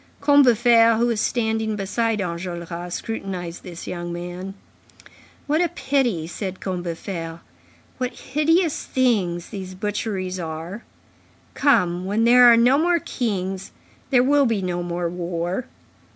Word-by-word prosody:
Combeferre, 240 Hz, -5 st, +5 dB
who 235 Hz, -, +2 dB
was 230 Hz, -3 st, 0 dB
standing 220 Hz, -2 st, 0 dB
beside 215 Hz, +2 st, -1 dB
Enjolras, 175 Hz, -1 st, -5 dB
scrutinized 185 Hz, -6 st, -5 dB
this 175 Hz, -2 st, -9 dB
young 175 Hz, -1 st, -5 dB
man. 175 Hz, +2 st, -6 dB, 0.9 s
"What 305 Hz, +3 st, +1 dB
a 350 Hz, -, +2 dB
pity!" 265 Hz, -, 0 dB
said 185 Hz, +2 st, -5 dB
Combeferre. 170 Hz, -2 st, -5 dB, 0.6 s
"What 250 Hz, 0 st, -2 dB, 0.2 s
hideous 325 Hz, +2 st, +2 dB
things 195 Hz, -10 st, 0 dB
these 190 Hz, -3 st, -7 dB
butcheries 195 Hz, -2 st, -3 dB
are! 165 Hz, +6 st, -6 dB, 0.7 s
Come, 180 Hz, -11 st, +2 dB
when 205 Hz, +4 st, +1 dB
there 245 Hz, +1 st, +7 dB
are 230 Hz, -, +6 dB
no 250 Hz, +4 st, +5 dB
more 345 Hz, +2 st, +3 dB
kings, 195 Hz, -, -3 dB, 0.4 s
there 250 Hz, -3 st, +4 dB
will 280 Hz, 0 st, +4 dB
be 215 Hz, -4 st, 0 dB
no 175 Hz, -1 st, -2 dB
more 175 Hz, 0 st, -2 dB
war. 175 Hz, +4 st, -3 dB
195 Hz, 125 wpm, -23 LUFS, 175-240 Hz, 0.9 s, there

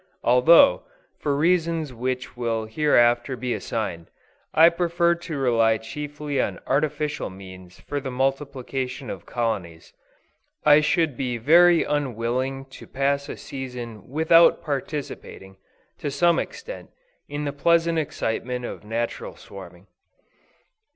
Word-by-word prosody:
Although, 125 Hz, -, +6 dB, 0.4 s
for 145 Hz, -2 st, -1 dB
reasons 165 Hz, -2 st, +1 dB
which 125 Hz, +2 st, -4 dB
will 115 Hz, -2 st, -2 dB
hereafter 120 Hz, 0 st, +2 dB
be 125 Hz, -1 st, -2 dB
assigned, 85 Hz, -7 st, -4 dB, 0.4 s
I 165 Hz, +2 st, +7 dB
prefer 170 Hz, 0 st, +1 dB
to 170 Hz, -3 st, -6 dB
rely 115 Hz, -4 st, +3 dB
chiefly 145 Hz, +4 st, -4 dB
on -, -, -3 dB
artificial 150 Hz, +1 st, -1 dB
means 95 Hz, -1 st, -12 dB
for 145 Hz, -, -4 dB
the 135 Hz, -1 st, -5 dB
multiplication 135 Hz, 0 st, -3 dB
of -, -, -9 dB
colonies, 100 Hz, -9 st, -3 dB, 0.7 s
I 150 Hz, 0 st, +7 dB
should 160 Hz, -3 st, +1 dB
be 125 Hz, -1 st, -2 dB
very 170 Hz, +7 st, +5 dB
unwilling 130 Hz, -1 st, -2 dB, 0.2 s
to -, -, -11 dB
pass 140 Hz, +1 st, -1 dB
a -, -, -6 dB
season 125 Hz, -6 st, -8 dB
without 160 Hz, +4 st, +4 dB
participating, 140 Hz, -, -5 dB, 0.4 s
to 145 Hz, -, -3 dB
some 170 Hz, +4 st, +2 dB
extent, -, -, -7 dB, 0.4 s
in 145 Hz, +1 st, -4 dB
the 140 Hz, -, -3 dB
pleasing 170 Hz, +2 st, +2 dB
excitement 125 Hz, -3 st, -3 dB
of -, -, -7 dB
natural 120 Hz, -, -4 dB
swarming. -, -, -12 dB
135 Hz, 120 wpm, -24 LUFS, 120-155 Hz, 0.7 s, I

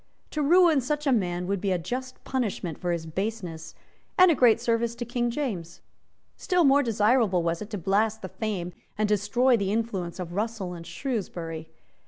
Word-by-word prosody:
To 305 Hz, -, -1 dB
ruin 330 Hz, -1 st, +5 dB
such 295 Hz, +4 st, -2 dB
a 275 Hz, -, +3 dB
man 180 Hz, -6 st, 0 dB
would 195 Hz, 0 st, -1 dB
be 200 Hz, -, 0 dB
a 185 Hz, -, +2 dB
just 255 Hz, +9 st, -5 dB
punishment 210 Hz, -, -2 dB
for 175 Hz, -, -1 dB
his 170 Hz, -2 st, -2 dB
baseness, 180 Hz, -1 st, -4 dB, 0.4 s
and 370 Hz, -1 st, +7 dB
a -, -, +5 dB
great 245 Hz, -5 st, +5 dB
service 235 Hz, 0 st, 0 dB
to 240 Hz, -, -5 dB
King 240 Hz, 0 st, -1 dB
James. 215 Hz, -, -4 dB, 0.6 s
Still 360 Hz, -2 st, +1 dB
more 280 Hz, 0 st, +5 dB
desirable 220 Hz, -5 st, +2 dB
was 165 Hz, 0 st, -1 dB
it 210 Hz, -, -6 dB
to 210 Hz, -, -4 dB
blast 210 Hz, +4 st, +1 dB
the -, -, -3 dB
fame 185 Hz, -5 st, -3 dB, 0.2 s
and 215 Hz, 0 st, +1 dB
to 210 Hz, -, +2 dB
destroy 240 Hz, +6 st, +3 dB
the 200 Hz, -3 st, -1 dB
influence 200 Hz, -6 st, -2 dB
of 175 Hz, -1 st, -5 dB
Russell 205 Hz, -2 st, -2 dB
and 170 Hz, -1 st, -9 dB
Shrewsbury. 170 Hz, -, -4 dB
215 Hz, 190 wpm, -27 LUFS, 180-245 Hz, 0.6 s, and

